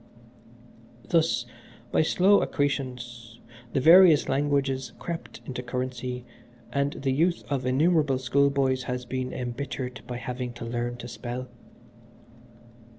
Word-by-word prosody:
"Thus, 160 -8 +2 0.5
by - - +3
slow 190 +5 +4
accretions, 125 -5 -3 0.3
the - - +2
various 165 +2 +7
languages 135 -1 0
crept 170 -1 -6
into 125 -1 -5
currency, 125 0 -4 0.5
and 140 0 +1
the 135 -1 -2
youth 170 +6 +1
of 130 -2 -1
innumerable 145 0 +3
schoolboys 135 0 +2
has 125 -1 -3
been 130 +1 -3
embittered 125 0 -4
by 125 - -4
having 125 0 -4
to 120 -1 -7
learn 120 +1 -3
to 120 0 -8
spell. 120 +1 -6
130 Hz, 115 wpm, -27 LUFS, 125-140 Hz, 0.5 s, various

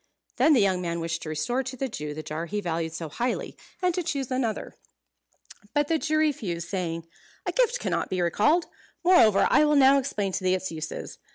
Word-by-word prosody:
Then 310 - +5
the 250 - +5
young 190 -2 +2
man 170 -1 -2
wished 165 0 -3
to 155 - -6
restore 155 - -1
to 260 0 -6
the 270 - -1
Jew 150 - -5
the 155 - -6
jar 160 +3 -4
he 210 +4 -2
valued 165 -3 -2
so 165 0 -5
highly, 240 - -3 0.3
and 360 -1 +3
to 360 - -1
choose 280 -6 -3
another. 250 -4 -2 1.0
But 290 0 +2
the 325 -1 +2
Jew 310 +1 0
refused, 220 - -1
saying, 170 -3 -3 0.4
"A - - 0
gift - - +2
cannot - - -1
be 185 - -2
recalled. 215 - +2 0.4
Moreover, 240 - +5
I - - +6
will 300 0 +3
now 275 0 +6
explain 205 -7 -2
to 185 - -3
thee 185 0 +3
its 185 -1 -4
uses. 155 -1 -6
205 Hz, 205 wpm, -26 LUFS, 170-280 Hz, 1.0 s, I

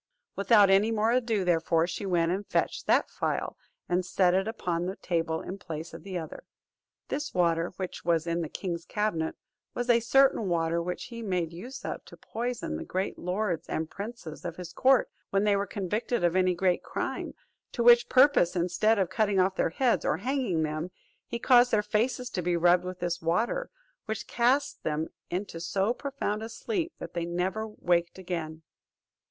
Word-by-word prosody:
Without 200 -1 +5
any 200 +3 +5
more 220 0 +2
ado, 230 -6 +1
therefore, 165 -1 +2
she 185 +3 -4
went 170 -2 +2
and 200 +2 -3
fetched - - -1
that - - +4
phial, - - -2 0.3
and 180 +1 +1
set 180 0 +2
it 190 +2 +1
upon 175 -6 -2
the 190 - -3
table 165 -3 -1
in 195 +2 -6
place 160 -2 -7
of - - -8
the 190 -2 -5
other. 160 -2 -7 0.7
This 290 +1 -3
water 170 -1 +2
which 185 -2 -5
was 165 -2 +1
in 170 0 -1
the 160 - -4
king's 170 -3 -4
cabinet, 210 -7 -1 0.4
was 245 0 +2
a 235 - +5
certain 235 -3 +3
water 170 0 +1
which 180 +1 -4
he 235 -1 -8
made 180 -6 -1
use 235 +11 -8
of - - -4
to - - -13
poison 235 - -4
the - - -5
great 190 +2 -3
lords 180 -2 -2
and 160 0 -2
princes 200 -6 -7
of 175 -2 -4
his 180 -1 -8
court 260 -1 +4 0.2
when 195 +1 +1
they 205 -1 +3
were 200 0 -1
convicted 205 +3 -2
of 175 0 +2
any 185 -1 +3
great 180 0 +1
crime; - - -4 0.4
to 235 - -1
which 240 0 +7
purpose, 255 -10 +5
instead 180 +6 +2
of 190 -3 0
cutting 205 -3 +2
off 190 +1 +2
their - - +1
heads, 245 +8 +1
or - - +1
hanging 250 - 0
them, 155 +3 -3 0.4
he 235 - -3
caused 245 +1 +5
their 210 -3 +2
faces 235 +4 -1
to 180 - -2
be 175 0 +1
rubbed 175 +1 +4
with 185 -1 -6
this 175 -1 -2
water, 225 - 0 0.4
which 220 -2 -4
cast 260 +4 +1
them 155 +1 -2 0.2
into 180 -1 -4
so 195 +6 0
profound 255 -6 -3
a 225 - -5
sleep 340 - -3
that - - -8
they 170 - -2
never 185 +5 -1
waked 175 -5 0
again. 165 -4 -5
190 Hz, 190 wpm, -28 LUFS, 170-225 Hz, 0.7 s, which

